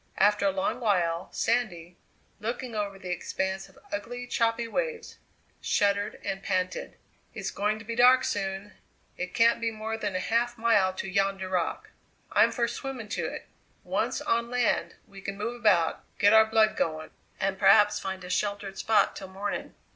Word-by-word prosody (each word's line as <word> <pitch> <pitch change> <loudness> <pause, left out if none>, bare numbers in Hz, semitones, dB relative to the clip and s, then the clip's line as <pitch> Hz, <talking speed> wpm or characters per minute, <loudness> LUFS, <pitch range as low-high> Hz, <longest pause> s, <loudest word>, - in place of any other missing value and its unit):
After 205 0 +4
a - - +3
long 190 +6 -1
while 180 -7 +1
Sandy, 180 -8 -1 0.4
looking 235 +3 -4
over 205 -2 -3
the 185 -2 -6
expanse 190 +2 -3
of 190 - -22
ugly 245 +5 -4
choppy 230 -1 0
waves, 470 - -3 0.4
shuddered 205 0 +1
and 195 -1 -3
panted: 185 -1 -2 0.4
"It's - - -3
going 210 +1 0
to 220 - -11
be 230 +1 -4
dark 250 +2 +6
soon; 195 -1 -3 0.4
it 180 0 -5
can't 230 0 +4
be 230 - +1
more 220 0 -4
than 205 -3 -2
a - - +1
half 235 +4 0
mile 225 -5 +3
to 190 - -5
yonder 195 0 0
rock 180 -3 -2 0.4
I'm - - +5
for 235 -2 0
swimming 240 -2 -6
to - - -2
it! - - -7 0.4
Once - - -1
on 235 0 0
land 245 -1 0
we 195 -1 -13
can 200 +1 -5
move 230 +4 -3
about, 180 -7 +3 0.2
get 205 +1 +5
our 220 0 +8
blood 220 -1 +3
going, 155 -1 -2 0.3
and 195 0 -1
perhaps 205 - +6
find 190 -1 -5
a 180 - -8
sheltered 200 0 -2
spot 220 - +3
till 190 - -7
morning!" 195 +2 -5
205 Hz, 170 wpm, -28 LUFS, 190-230 Hz, 0.4 s, our